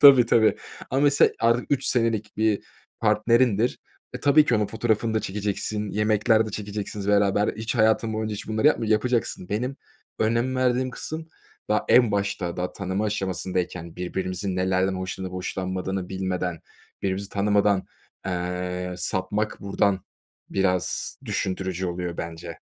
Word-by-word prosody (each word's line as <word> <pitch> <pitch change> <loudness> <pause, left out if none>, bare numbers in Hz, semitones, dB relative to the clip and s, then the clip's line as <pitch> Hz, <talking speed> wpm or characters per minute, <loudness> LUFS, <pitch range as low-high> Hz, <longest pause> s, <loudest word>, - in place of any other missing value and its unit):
Tabii, 135 -4 +9
tabii, 110 -2 +4 0.3
ama 135 - +1
mesela 145 -1 +5
artık 115 +1 +3
3 140 - +1
senelik 115 -3 0
bir 110 -2 +1 0.4
partnerindir. 115 +1 +3 0.4
E, - - -5
tabii 150 +1 +6
ki 125 - +2
onun 105 -1 +1
fotoğrafını 110 0 0
da 110 - +2
çekeceksin, 105 +1 -2
yemekler 110 +1 +3
de - - -5
çekeceksiniz 105 -1 -5
beraber 100 0 +3
hiç 110 +3 -3
hayatın 110 0 +3
boyunca 110 0 -2
hiç 105 - -7
bunları 110 +6 +1
yapmıcak 115 -7 +3
yapacaksın. 115 -5 0
Benim 125 +6 -2 0.4
önem 115 +4 +1
verdiğim 130 0 +1
kısım 160 +5 -6 0.4
daha 105 - +2
en 120 -3 +6
başta, 100 -4 -1
daha 90 - -2
tanıma 95 +2 -2
aşamasındayken 90 -4 -3
birbirimizin 95 +1 -3
nelerden 95 +1 +1
hoşlanıp 95 0 -4
hoşlanmadığını 95 0 -3
bilmeden, 90 -3 -2 0.4
birbirimizi 95 +1 -1
tanımadan, 100 -1 +2 0.4
eee, 90 0 -3
sapmak 95 +4 -1
buradan 100 -1 +1 0.5
biraz 95 -2 0
düşündürücü 95 -1 -2
oluyor 85 -1 -3
bence. 85 0 -6
100 Hz, 135 wpm, -25 LUFS, 95-110 Hz, 0.5 s, Tabii